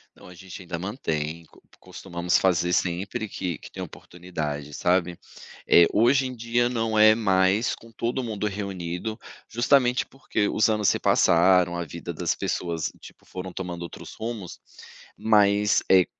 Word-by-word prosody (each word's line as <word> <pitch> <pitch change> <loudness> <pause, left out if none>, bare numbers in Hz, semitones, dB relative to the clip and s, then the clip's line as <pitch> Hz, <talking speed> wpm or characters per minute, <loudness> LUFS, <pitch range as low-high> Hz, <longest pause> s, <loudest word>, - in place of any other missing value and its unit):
Não, - - -15
a 90 - -12
gente 95 +2 -10
ainda 85 -1 -5
mantém 85 - -3
co - - -22 0.2
costumamos 90 -1 -2
fazer 90 -2 +2
sempre 95 +6 -1
que 90 -5 -4
que - - -13
tem - - -7
oportunidade, 75 -5 -6
sabe? 90 +1 +1 0.5
Eh, 85 - +7
hoje 130 +5 +3
em 130 - -7
dia 120 +1 0
não 115 -2 -1
é 110 0 +7
mais 95 0 +2
com 115 - -17
todo 120 +3 -2
mundo 105 -3 -3
reunido, 100 0 -4 0.3
justamente 125 +1 +2
porque 115 -6 -2
os 110 +1 +2
anos 105 -2 +1
se - - +3
passaram, 90 0 +4
a 85 - -2
vida 80 - -7
das - - -1
pessoas, 85 -3 -2
tipo, - - -15
foram 95 0 -7
tomando 90 -1 -6
outros 85 - -9
rumos, 110 -5 -6 0.6
mas, 105 -1 +3
eh, 95 -2 +6
95 Hz, 155 wpm, -25 LUFS, 85-110 Hz, 0.6 s, Eh